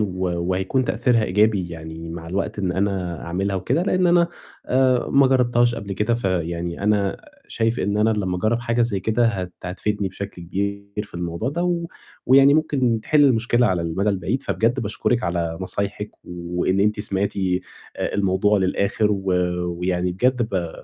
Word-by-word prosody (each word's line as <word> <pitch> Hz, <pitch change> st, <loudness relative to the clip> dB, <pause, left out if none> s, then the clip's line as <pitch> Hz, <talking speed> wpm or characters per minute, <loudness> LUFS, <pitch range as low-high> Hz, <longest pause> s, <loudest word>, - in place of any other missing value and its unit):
و 105 Hz, -, +2 dB, 0.4 s
وهيكون 95 Hz, +8 st, 0 dB
تأثيرها 115 Hz, -1 st, +2 dB
إيجابي 100 Hz, -1 st, +2 dB
يعني 80 Hz, 0 st, -8 dB
مع 85 Hz, 0 st, -7 dB
الوقت، 95 Hz, +4 st, -3 dB
إن 95 Hz, -3 st, 0 dB
أنا 95 Hz, -4 st, -2 dB
أعملها 95 Hz, +3 st, -1 dB
وكده، 95 Hz, -, 0 dB
لإن 185 Hz, -1 st, +2 dB
أنا 170 Hz, 0 st, +4 dB, 0.4 s
آآ 130 Hz, -1 st, +2 dB
ما 140 Hz, 0 st, +5 dB
جرّبتهاش 120 Hz, -2 st, +3 dB
قبل 100 Hz, -3 st, -5 dB
كده، 105 Hz, +4 st, 0 dB
فيعني 85 Hz, -5 st, -2 dB
أنا 100 Hz, -2 st, +1 dB, 0.3 s
شايف 115 Hz, +1 st, 0 dB
إن 100 Hz, +2 st, 0 dB
أنا 110 Hz, +1 st, +3 dB
لمّا 95 Hz, -4 st, -1 dB
أجرّب 110 Hz, +5 st, 0 dB
حاجة 120 Hz, 0 st, +1 dB
زَي 105 Hz, -5 st, 0 dB
كده، 110 Hz, +4 st, +2 dB
هت 95 Hz, -5 st, -2 dB
هتفيدني 100 Hz, +2 st, -2 dB
بشكل 95 Hz, -1 st, -7 dB
كبير 100 Hz, +3 st, -4 dB
في 100 Hz, -, -15 dB
الموضوع 85 Hz, +5 st, -3 dB
ده، 165 Hz, +5 st, -2 dB
و 170 Hz, -1 st, 0 dB, 0.4 s
ويعني 135 Hz, +2 st, +7 dB
ممكن 130 Hz, -7 st, +1 dB
تحل 150 Hz, -1 st, +4 dB
المشكلة 120 Hz, -1 st, +3 dB
على 90 Hz, -5 st, 0 dB
المدى 85 Hz, +5 st, -1 dB
البعيد، 100 Hz, +5 st, -1 dB
فبجد 115 Hz, +4 st, 0 dB
باشكرِك 115 Hz, +2 st, -1 dB
على 85 Hz, -1 st, -2 dB
نصايحِك، 100 Hz, +3 st, -3 dB
وإن 90 Hz, +2 st, -1 dB
أنتِ 105 Hz, +1 st, +1 dB
سمعتِ 100 Hz, -1 st, -2 dB
آآ 95 Hz, -2 st, -3 dB
الموضوع 100 Hz, +1 st, +2 dB
للآخِر، 100 Hz, +3 st, +1 dB
و 100 Hz, -1 st, -2 dB, 0.6 s
ويعني 90 Hz, 0 st, 0 dB
بجد 125 Hz, +6 st, +1 dB
ب 95 Hz, -7 st, -2 dB
100 Hz, 165 wpm, -22 LUFS, 90-120 Hz, 0.6 s, ويعني